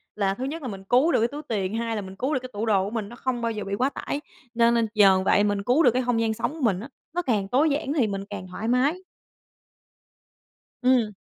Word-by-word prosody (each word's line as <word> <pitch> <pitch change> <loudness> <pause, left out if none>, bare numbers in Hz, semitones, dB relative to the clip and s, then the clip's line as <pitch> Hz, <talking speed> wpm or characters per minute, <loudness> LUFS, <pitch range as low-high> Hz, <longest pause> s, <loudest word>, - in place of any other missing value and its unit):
là 195 -2 +1
thứ 250 - -6
nhất 315 +4 -4
là 260 - -5
mình 195 -3 -7
cứu 255 - +3
được - - +3
cái 230 - +3
túi 290 +4 -7
tiền, 205 -2 -2
hai 230 -1 -2
là 210 - -2
mình 190 0 -9
cứu 265 +8 -1
được 260 - +1
cái 255 0 -9
tủ 210 +2 -2
đồ 200 -4 +3
của - - -3
mình 215 -2 -4
nó 240 - -10
không 250 -1 -2
bao 230 0 0
giờ 210 -1 -4
bị 200 0 -3
quá 260 +5 +1
tải. 285 +1 -4 0.3
Nên 235 0 +4
nên 230 -1 +2
nhờ 195 -3 +6
vậy 205 - +4
mình 205 -1 0
cứu 255 +9 +3
được 245 - +6
cái 255 +1 0
không 235 -2 +1
gian 220 -1 +1
sống 235 +5 -2
của 320 - -9
mình 200 -7 +2
á, 240 +7 -8 0.3
nó 355 - +1
càng 210 - 0
tối 280 +8 +3
giản 285 0 -1
thì 255 -8 +2
mình 195 -1 -3
càng 190 -3 -6
thoải 195 +5 -5
mái. 270 +8 +2 1.8
Ừm. 250 -4 +3
230 Hz, 270 wpm, -25 LUFS, 205-255 Hz, 1.8 s, nhờ